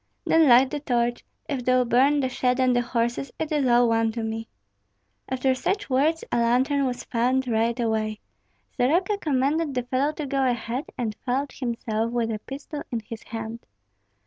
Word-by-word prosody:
"Then 325 Hz, -1 st, +5 dB
light 255 Hz, +2 st, +6 dB
the 295 Hz, -, -2 dB
torch; 240 Hz, -3 st, 0 dB, 0.2 s
if 275 Hz, -5 st, -3 dB
thou 255 Hz, 0 st, +3 dB
burn 270 Hz, +5 st, +3 dB
the 260 Hz, -, +1 dB
shed 250 Hz, 0 st, 0 dB
and 255 Hz, -1 st, +3 dB
the 245 Hz, -, +3 dB
horses, 240 Hz, +2 st, -2 dB
it 320 Hz, -1 st, -3 dB
is 290 Hz, -4 st, +1 dB
all 240 Hz, 0 st, +5 dB
one 225 Hz, -1 st, +2 dB
to 230 Hz, 0 st, -3 dB
me." 225 Hz, 0 st, -4 dB, 0.8 s
After 260 Hz, 0 st, +1 dB
such 390 Hz, +6 st, -2 dB
words 305 Hz, +5 st, +2 dB
a -, -, +1 dB
lantern 260 Hz, +4 st, +2 dB
was 250 Hz, -1 st, -4 dB
found 255 Hz, +2 st, 0 dB
right 230 Hz, +1 st, +1 dB
away. 220 Hz, -2 st, -1 dB, 0.6 s
Soroka 350 Hz, +11 st, +2 dB
commanded 290 Hz, 0 st, 0 dB
the 250 Hz, -, 0 dB
fellow 260 Hz, +4 st, 0 dB
to 300 Hz, -, -5 dB
go 275 Hz, 0 st, 0 dB
ahead, 245 Hz, +2 st, -1 dB
and 225 Hz, -4 st, -2 dB
followed 270 Hz, +3 st, -1 dB
himself 230 Hz, -3 st, -2 dB
with 235 Hz, -2 st, 0 dB
a 215 Hz, -, -3 dB
pistol 285 Hz, +5 st, -7 dB
in 235 Hz, -2 st, -2 dB
his 220 Hz, +1 st, -9 dB
hand. 225 Hz, 0 st, -7 dB
250 Hz, 180 wpm, -25 LUFS, 235-275 Hz, 0.8 s, light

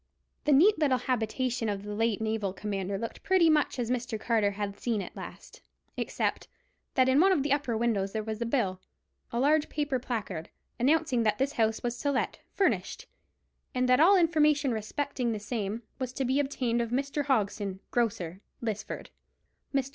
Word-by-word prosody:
The 295 Hz, -, +3 dB
neat 340 Hz, +8 st, +6 dB
little 280 Hz, -5 st, +3 dB
habitation 245 Hz, -1 st, -1 dB
of 200 Hz, -1 st, -3 dB
the 210 Hz, 0 st, -5 dB
late 225 Hz, 0 st, 0 dB
naval 220 Hz, -3 st, -1 dB
commander 195 Hz, -1 st, -3 dB
looked 230 Hz, +3 st, -5 dB
pretty 365 Hz, -4 st, +4 dB
much 300 Hz, -2 st, +2 dB
as 240 Hz, -1 st, -1 dB
Mr. 240 Hz, -3 st, -2 dB
Carter 220 Hz, -3 st, +2 dB
had 200 Hz, 0 st, -4 dB
seen 230 Hz, -3 st, 0 dB
it 190 Hz, -, -6 dB
last, -, -, -10 dB, 0.3 s
except -, -, -2 dB, 0.5 s
that 260 Hz, -1 st, +4 dB
in 260 Hz, +2 st, +4 dB
one 385 Hz, +4 st, +6 dB
of 320 Hz, -8 st, +2 dB
the 285 Hz, -1 st, +2 dB
upper 270 Hz, -6 st, 0 dB
windows 215 Hz, -4 st, 0 dB
there 220 Hz, 0 st, -2 dB
was 220 Hz, +1 st, -5 dB
a 235 Hz, -, 0 dB
bill—a 230 Hz, 0 st, -4 dB
large 295 Hz, +3 st, +3 dB
paper 290 Hz, -3 st, -1 dB
placard—announcing 245 Hz, -, -1 dB
that 215 Hz, -2 st, +2 dB
this 270 Hz, +2 st, +1 dB
house 220 Hz, -1 st, +1 dB
was 240 Hz, 0 st, -2 dB
to 285 Hz, -, 0 dB
let, 270 Hz, -, -1 dB, 0.2 s
furnished; 330 Hz, -, 0 dB, 0.7 s
and 255 Hz, 0 st, +2 dB
that 250 Hz, +1 st, +5 dB
all 380 Hz, +6 st, +7 dB
information 300 Hz, -5 st, +3 dB
respecting 240 Hz, +2 st, -2 dB
the 215 Hz, -, -3 dB
same 215 Hz, 0 st, -3 dB, 0.2 s
was 255 Hz, -2 st, -2 dB
to 270 Hz, -, -1 dB
be 260 Hz, +3 st, +2 dB
obtained 255 Hz, -4 st, 0 dB
of 235 Hz, -, -2 dB
Mr. 280 Hz, +3 st, -1 dB
Hogson, 205 Hz, -6 st, 0 dB
grocer, 195 Hz, -6 st, -1 dB, 0.2 s
Lisford. 215 Hz, -3 st, -4 dB, 0.6 s
Mr. 275 Hz, -1 st, 0 dB
240 Hz, 175 wpm, -29 LUFS, 215-280 Hz, 0.7 s, all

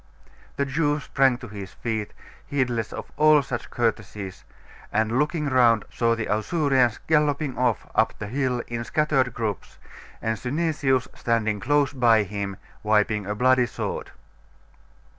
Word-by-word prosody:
The 140 Hz, -, 0 dB
Jew 145 Hz, +1 st, 0 dB
sprang 135 Hz, -2 st, +2 dB
to 120 Hz, -, -9 dB
his 100 Hz, -3 st, -8 dB
feet, 110 Hz, -1 st, -3 dB, 0.4 s
heedless 125 Hz, -6 st, -1 dB
of -, -, -7 dB
all 150 Hz, -1 st, +6 dB
such 120 Hz, -2 st, -5 dB
courtesies, 105 Hz, -4 st, -3 dB, 0.5 s
and, 110 Hz, +3 st, +1 dB
looking 150 Hz, +1 st, 0 dB
round, 120 Hz, -5 st, +4 dB
saw 115 Hz, -1 st, +2 dB
the 115 Hz, -1 st, -3 dB
Ausurians 125 Hz, -, +1 dB
galloping 150 Hz, -3 st, +1 dB
off 125 Hz, -3 st, 0 dB
up 110 Hz, 0 st, +2 dB
the 105 Hz, -, -5 dB
hill 125 Hz, +1 st, -1 dB
in 120 Hz, 0 st, -4 dB
scattered 135 Hz, -2 st, +1 dB
groups, 110 Hz, -4 st, -4 dB, 0.4 s
and 110 Hz, -1 st, -2 dB
Synesius 135 Hz, -2 st, 0 dB
standing 115 Hz, -4 st, 0 dB
close 145 Hz, +4 st, +2 dB
by 115 Hz, -5 st, +4 dB
him, 100 Hz, -1 st, -4 dB, 0.2 s
wiping 105 Hz, -1 st, +1 dB
a 105 Hz, -, -2 dB
bloody 125 Hz, +2 st, +3 dB
sword. -, -, -4 dB
120 Hz, 140 wpm, -25 LUFS, 110-140 Hz, 0.5 s, all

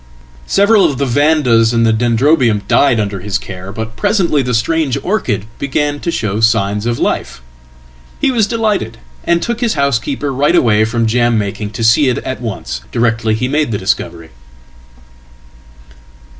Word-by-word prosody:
Several 200 Hz, +1 st, +4 dB
of 145 Hz, -6 st, 0 dB
the 140 Hz, -, 0 dB
Vandas 130 Hz, -4 st, +2 dB
and 115 Hz, 0 st, +3 dB
the 110 Hz, -, +3 dB
Dendrobium 120 Hz, -1 st, +2 dB
died 135 Hz, -5 st, +3 dB
under 100 Hz, -2 st, -2 dB
his 100 Hz, +2 st, -2 dB
care, 95 Hz, -2 st, -9 dB
butpresently 150 Hz, -, 0 dB
the 125 Hz, -2 st, -1 dB
strange 140 Hz, +3 st, 0 dB
orchid 130 Hz, -, -1 dB
began 145 Hz, +1 st, -1 dB
to 170 Hz, -, -4 dB
show 105 Hz, -9 st, -2 dB
signs 110 Hz, -1 st, +1 dB
of 120 Hz, 0 st, -1 dB
life. -, -, -2 dB, 0.8 s
He 270 Hz, -, +1 dB
wasdelighted, 215 Hz, -, 0 dB, 0.3 s
and 170 Hz, 0 st, +1 dB
took 235 Hz, 0 st, -3 dB
his 235 Hz, -7 st, 0 dB
housekeeper 140 Hz, 0 st, -1 dB
right 145 Hz, +6 st, +2 dB
away 110 Hz, -8 st, +3 dB
from 115 Hz, +1 st, -1 dB
jam 120 Hz, +1 st, +1 dB
making 105 Hz, 0 st, -3 dB
to 115 Hz, +1 st, -4 dB
see 125 Hz, +4 st, +4 dB
itat 130 Hz, +1 st, -4 dB
once, 95 Hz, -, -5 dB
directly 115 Hz, -2 st, 0 dB
he 125 Hz, +3 st, -2 dB
made 145 Hz, -1 st, 0 dB
the 105 Hz, -, -1 dB
discovery." 95 Hz, -5 st, -3 dB
120 Hz, 150 wpm, -14 LUFS, 110-150 Hz, 0.8 s, Several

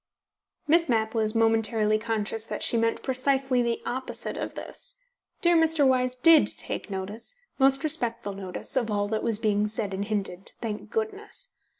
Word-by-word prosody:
Miss 330 Hz, 0 st, +4 dB
Mapp 220 Hz, -2 st, +1 dB
was 220 Hz, -1 st, +2 dB
momentarily 225 Hz, -1 st, +3 dB
conscious 220 Hz, -1 st, -1 dB
that -, -, -4 dB
she -, -, +2 dB
meant 230 Hz, 0 st, 0 dB
precisely 265 Hz, -1 st, +1 dB
the 235 Hz, -1 st, -1 dB
opposite 260 Hz, +1 st, -3 dB
of -, -, -5 dB
this. -, -, -5 dB, 0.5 s
Dear 345 Hz, 0 st, +5 dB
Mr. 320 Hz, -3 st, +3 dB
Wyse 255 Hz, -1 st, +2 dB
DID 315 Hz, +5 st, +6 dB
take -, -, -5 dB
notice, 200 Hz, -, -5 dB, 0.2 s
most 270 Hz, 0 st, +4 dB
respectful 235 Hz, -9 st, 0 dB
notice, 190 Hz, +5 st, -7 dB
of 240 Hz, -4 st, 0 dB
all 205 Hz, -1 st, 0 dB
that 220 Hz, 0 st, -1 dB
was 230 Hz, -3 st, +2 dB
being 210 Hz, -1 st, +1 dB
said 210 Hz, -2 st, -3 dB
and 190 Hz, +1 st, -2 dB
hinted, 195 Hz, -3 st, -4 dB
thank 215 Hz, -3 st, -5 dB
goodness! 435 Hz, +2 st, -4 dB
230 Hz, 165 wpm, -26 LUFS, 215-270 Hz, 0.5 s, DID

